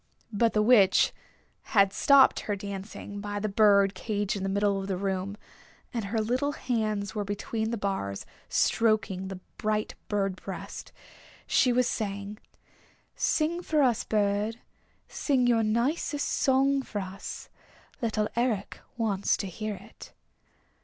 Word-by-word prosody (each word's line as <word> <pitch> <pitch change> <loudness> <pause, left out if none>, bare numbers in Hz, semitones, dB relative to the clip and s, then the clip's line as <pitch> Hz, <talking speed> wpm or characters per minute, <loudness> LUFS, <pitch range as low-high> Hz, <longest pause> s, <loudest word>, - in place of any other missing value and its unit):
But 225 +2 +2
the 215 - +3
Witch 210 -5 +5 0.6
had 200 0 +5
stopped 280 -1 +5
her 205 - -2
dancing 200 +1 -7
by 205 0 -3
the 215 - -1
bird 200 -1 +4
cage 205 +1 -2
in 200 - -4
the 195 - -1
middle 200 0 +1
of 195 - -6
the 190 -2 -1
room, 195 +1 -2 0.6
and 230 -4 -2
her 215 +3 -2
little 255 +6 0
hands 215 -7 -2
were 210 - -2
between 220 +2 -3
the 235 - -2
bars 195 - -3 0.2
stroking 215 -4 +1
the 190 -1 -6 0.2
bright 215 0 -1
bird 195 -2 -1
breast. - - -8 0.5
She 250 - +3
was 250 0 +2
saying, 200 -1 -4 0.8
"Sing 330 +3 +1
for 310 -4 +2
us, 245 -4 +2
bird. 210 +1 0 0.5
Sing 265 -4 +1
your 235 -2 +4
nicest 250 +7 0
song 275 +1 +2
for 220 -5 -5
us. 190 0 -7 0.5
Little 215 -2 0
Eric 235 -4 -1 0.2
wants 205 -4 +1
to - - -3
hear 210 +3 -4
it." 200 +4 -13
210 Hz, 140 wpm, -28 LUFS, 200-235 Hz, 0.8 s, Witch